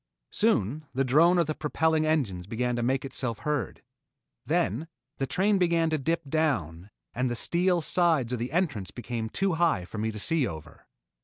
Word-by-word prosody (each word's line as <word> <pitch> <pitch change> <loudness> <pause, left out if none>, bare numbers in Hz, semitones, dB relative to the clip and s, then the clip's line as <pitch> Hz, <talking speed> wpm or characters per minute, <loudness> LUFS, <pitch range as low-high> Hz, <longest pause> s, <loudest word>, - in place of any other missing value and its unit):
Soon 155 - 0
the 135 - +2
drone 160 +8 +4
of 170 - +3
the 155 - -2
propelling 155 +1 0
engines 105 - -1
began 125 +3 -1
to 120 - -2
make 130 +3 0
itself 125 -4 -2
heard. 150 -3 -3 0.6
Then 120 - 0 0.3
the 135 - -1
train 200 +5 +2
began 170 -2 +2
to 155 - 0
dip 165 +2 -1
down 105 - -1 0.2
and 125 +1 0
the 120 - -2
steel 175 +6 +1
sides 155 -7 +2
of 125 - -2
the 120 +3 -3
entrance 145 - -1
became 115 -2 -5
too 195 - 0
high 160 - +1
for 105 - -7
me 110 +1 -1
to 105 - -8
see 145 +5 +1
over. 80 -2 -10
140 Hz, 180 wpm, -27 LUFS, 115-165 Hz, 0.6 s, drone